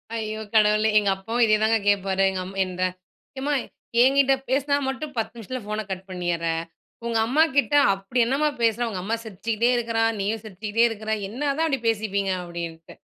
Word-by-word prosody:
ஐயோ 215 -1 -3
கடவுளே! 215 0 +4
எங்கப்பாவும் 205 +4 0
இதே 215 -1 +4
தாங்க 225 +1 +4
கேட்பாரு, 195 -1 +2
எங்கம்மா 190 +1 -5
இந்த 185 0 -6 0.6
"எம்மா! 290 +2 -1 0.5
என்கிட்ட 270 +1 +4 0.2
பேசினா 280 +2 +2
மட்டும் 285 +2 -4
10 225 +1 -2
நிமிஷத்தில 250 +3 -6
ஃபோன 215 0 -3
கட் 190 0 -5
பண்ணீர்ற. 175 -2 -2 0.6
உங்கம்மாகிட்ட, 270 +6 +2 0.2
அப்படி 195 +6 -3
என்னாம்மா 285 +5 +1
பேசுற? 230 +1 +2
உங்கம்மா 200 +4 -2
சிரிச்சுக்கிட்டே 220 +3 -1
இருக்கிறா! 230 -1 0 0.2
நீயும் 215 +2 -1
சிரிச்சுக்கிட்டே 215 +3 0
இருக்கிற! 220 0 -5 0.2
என்னதான் 290 +6 0
அப்படி 270 -5 -1
பேசிப்பீங்க" 200 -3 0
அப்படின்னுட்டு. 170 -1 -7
220 Hz, 145 wpm, -24 LUFS, 195-245 Hz, 0.6 s, கடவுளே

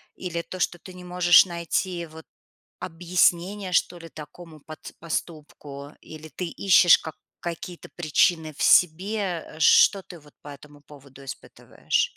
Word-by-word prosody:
Или 170 -2 -5
то, 185 +2 -10
что 175 -1 -2
ты 185 0 -13
не 180 - -12
можешь 180 0 +5
найти, 170 0 -3
вот, 160 0 -14 0.5
объяснение, 180 +3 -1
что 175 0 0
ли, 165 0 -12
такому 155 +1 -13
пат 155 +2 -12
поступку? 150 -3 -7
Или 155 0 -12
ты 180 - -7
ищешь 175 -1 +5
как 160 - -9 0.2
какие-то 175 +1 -8
причины 160 -1 0
в - - -5
себе, 180 +1 +2 0.2
а? - - -14
Что 195 +5 +5
ты 175 -2 -13
вот 150 -1 -20
по 145 - -13
этому 145 +1 -14
поводу 140 -2 -17
испытываешь? 475 - -4
170 Hz, 150 wpm, -24 LUFS, 155-180 Hz, 0.5 s, можешь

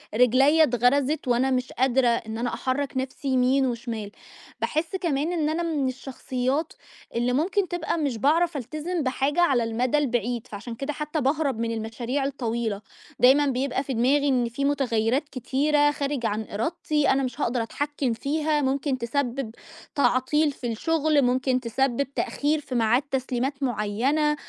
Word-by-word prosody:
رجليّا 265 +7 +5
اتغَرَسِت 260 +3 +2
وأنا 250 +2 +2
مش 255 0 -1
قادرة 260 0 +2
إن 225 -2 -1
أنا 240 +1 -2
أحرَّك 270 +1 -2
نَفْسي 265 +3 -4
يمين 260 +1 +3
وشمال. 235 -4 -4 0.5
باحس 320 +4 -1
كمان 325 -3 -1
إن 310 -3 0
أنا 330 +2 -1
من 305 -5 0
الشخصيّات 260 +3 -2 0.4
اللي 240 +1 +1
ممكن 370 +8 +1
تبقى 340 -1 -2
مش 280 -7 -1
باعرف 320 +6 +2
ألتزم 305 +7 -3
بحاجة 275 +5 0
على 270 -9 +3
المَدَى 235 +5 0
البعيد، 240 -4 -1
فعشان 220 +3 -7
كده 275 +5 -4
حتّى 300 +1 -3
باهرب 275 -2 0
من 230 0 -1
المشاريع 230 +4 -3
الطويلة. 235 -6 -2 0.4
دايمًا 270 +4 +6
بيبقى 265 0 -1
في 270 - -4
دماغي 270 +5 +2
إن 250 -3 +2
في 275 +4 -2
مُتغيّرات 270 0 +1
كتيرة 290 +3 +2
خارج 280 -4 -2
عن 215 0 -1
إرادتي 300 +6 0
أنا 270 0 +2
مش 250 -2 -4
هاقدر 240 0 0
أتحكِّم 285 +1 -2
فيها، 300 +4 0
ممكن 270 0 0
تسبِّب 250 0 -2 0.4
تعطيل 285 +3 +2
في 260 -3 -6
الشُغل، 310 +4 +1
ممكن 255 0 +1
تسبِّب 265 +3 -1
تأخير 300 +3 0
في 275 -3 -6
ميعاد 235 +2 +3
تسليمات 265 +1 -2
معيّنة، 255 +6 +1
265 Hz, 150 wpm, -25 LUFS, 245-290 Hz, 0.5 s, دايمًا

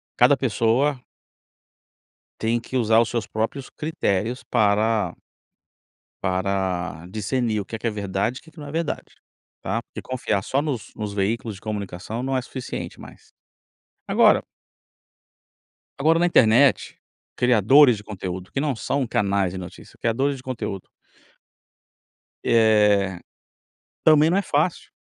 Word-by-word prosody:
cada - - +5
pessoa 125 +4 +1 1.4
tem 115 +1 +1
que 125 +2 -4
usar 115 -2 +4
os 115 - 0
seus 115 -2 -2
próprios 115 +5 -3
critérios 125 - -2
para 110 -1 +1 1.1
para 95 -3 -1
discernir 110 +2 -1
o - - -8
que 110 - -6
que 115 - -3
é - - +2
verdade 100 +4 -2
e - - -21
o - - -27
que 160 - -17
que 160 - -15
não 145 - -8
é - - -7
verdade, 165 0 -3 0.5
tá? - - -2
Porque - - -9
confiar 125 -6 -2
só 135 +7 0
nos 135 -8 -4
nos 105 -2 -4
veículos 105 +2 -1
de 95 - -14
comunicação 105 +2 -5
não 135 0 -1
é 130 - +1
suficiente 125 0 -7
mais. - - -14 0.8
Agora - - +5 1.6
Agora, 160 +4 +3
na 175 - +3
internet, 130 -3 +4 0.4
criadores 125 +2 +5
de 105 - -11
conteúdo 95 -3 -6
que - - -2
não 145 -3 0
são 135 +3 -1
canais 100 -3 +1
de - - -5
notícia 90 -1 -10
criadores 135 +5 0
de 130 - -13
conteúdo 110 -7 -5 1.6
Eh, 105 -5 +3 0.9
também 155 0 +6
não 185 - +3
é - - +1
fácil. 160 +1 -1
115 Hz, 140 wpm, -23 LUFS, 100-135 Hz, 1.6 s, também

